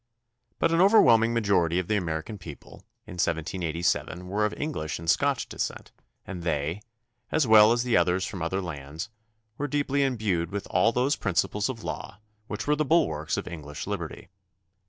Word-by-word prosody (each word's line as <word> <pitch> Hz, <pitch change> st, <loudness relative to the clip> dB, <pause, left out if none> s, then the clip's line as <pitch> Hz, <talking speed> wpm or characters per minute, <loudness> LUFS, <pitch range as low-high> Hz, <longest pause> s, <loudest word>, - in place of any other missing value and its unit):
But -, -, +2 dB
an 165 Hz, +1 st, +3 dB
overwhelming 115 Hz, -, +6 dB
ma 115 Hz, 0 st, +1 dB
jority 90 Hz, -4 st, +2 dB
of 90 Hz, -, -3 dB
the 105 Hz, -, +1 dB
American 85 Hz, +2 st, -3 dB
people 80 Hz, -6 st, -11 dB, 0.3 s
in 90 Hz, -, -9 dB
1787 85 Hz, +1 st, -1 dB
were 105 Hz, +3 st, 0 dB
of 105 Hz, -, -1 dB
English 140 Hz, -, -3 dB
and 85 Hz, -, -9 dB
Scotch 140 Hz, +8 st, +2 dB
descent -, -, -5 dB, 0.3 s
and 90 Hz, -3 st, -6 dB
they, 80 Hz, +3 st, -2 dB, 0.5 s
as 155 Hz, -, +2 dB
well 110 Hz, -1 st, +7 dB
as 120 Hz, 0 st, +2 dB
the 120 Hz, -2 st, +2 dB
others 90 Hz, +2 st, +2 dB
from 95 Hz, -4 st, -6 dB
other 95 Hz, +4 st, -1 dB
lands, 80 Hz, +3 st, -6 dB, 0.5 s
were 145 Hz, -, -1 dB
deeply 140 Hz, -1 st, 0 dB
imbued 105 Hz, -10 st, 0 dB
with 100 Hz, +1 st, -4 dB
all 115 Hz, -, +4 dB
those 130 Hz, +5 st, +1 dB
principles 100 Hz, +3 st, 0 dB
of 115 Hz, -4 st, -6 dB
law 105 Hz, -, -6 dB, 0.3 s
which 105 Hz, +1 st, -4 dB
were 150 Hz, -, +2 dB
the 155 Hz, -, +1 dB
bulwarks 80 Hz, -, +1 dB
of -, -, -4 dB
English 75 Hz, -3 st, -7 dB
liberty. -, -, -5 dB
100 Hz, 175 wpm, -27 LUFS, 85-120 Hz, 0.5 s, well